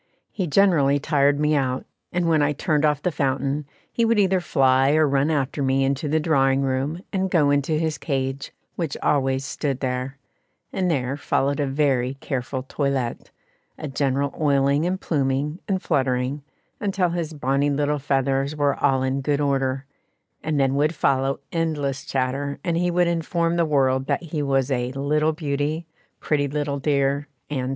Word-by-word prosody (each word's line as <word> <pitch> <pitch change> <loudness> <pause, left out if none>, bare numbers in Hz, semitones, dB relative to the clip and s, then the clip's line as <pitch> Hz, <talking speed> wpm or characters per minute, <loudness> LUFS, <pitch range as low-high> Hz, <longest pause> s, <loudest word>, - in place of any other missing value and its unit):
He 185 -4 -2
generally 150 -5 +4
tired 145 -1 +2
me 150 0 +2
out, 130 -3 0 0.3
and 175 -1 0
when 160 -2 +3
I 145 0 +2
turned 150 +1 +1
off 150 -2 +1
the 180 - +1
fountain, 140 0 -1 0.3
he 235 - +1
would 230 0 +3
either 190 -2 +3
fly 135 -3 +3
or 155 -1 +4
run 140 +2 +2
after 145 -2 -1
me 135 0 +2
into 135 +2 0
the 160 +2 +2
drawing 135 -4 +2
room 135 +6 -2
and 190 -1 0
go 150 -5 +3
into 145 +2 +1
his 155 0 -1
cage, 135 -2 -3 0.2
which 165 -5 -3
always 135 -2 +1
stood 135 -1 -2
there; 130 +1 -3 0.6
and 185 -2 0
there 135 -3 -1
followed 140 0 0
a 145 - +1
very 135 -2 +1
careful 130 -1 -4
toilette 135 -3 -2 0.5
a 155 - -5
general 140 0 0
oiling 140 +1 +2
and 185 +1 -1
pluming 145 +2 -1
and 190 -2 -1
fluttering, 130 -1 0 0.4
until 195 -3 0
his 170 -2 -3
bonnie 140 0 +1
little 145 +1 0
feathers 135 +1 0
were 145 -2 +2
all 130 -1 +3
in 130 +1 -1
good 145 +1 0
order; 135 -1 0 0.6
and 155 -2 -1
then 135 -1 +2
would 150 +4 +1
follow 135 0 +1
endless 145 -5 -1
chatter, 135 +2 -2
and 170 -2 0
he 175 +1 +1
would 175 0 +2
inform 170 0 0
the 170 -1 +2
world 135 -3 +1
that - - 0
he 155 -2 -3
was 135 -1 +1
a 125 -1 0
"little 150 +3 +1
beauty," 150 +1 -2 0.3
"pretty 145 -2 0
little 145 0 -2
dear," 140 0 +1 0.2
&c. 130 -3 -1
140 Hz, 170 wpm, -23 LUFS, 135-155 Hz, 0.6 s, generally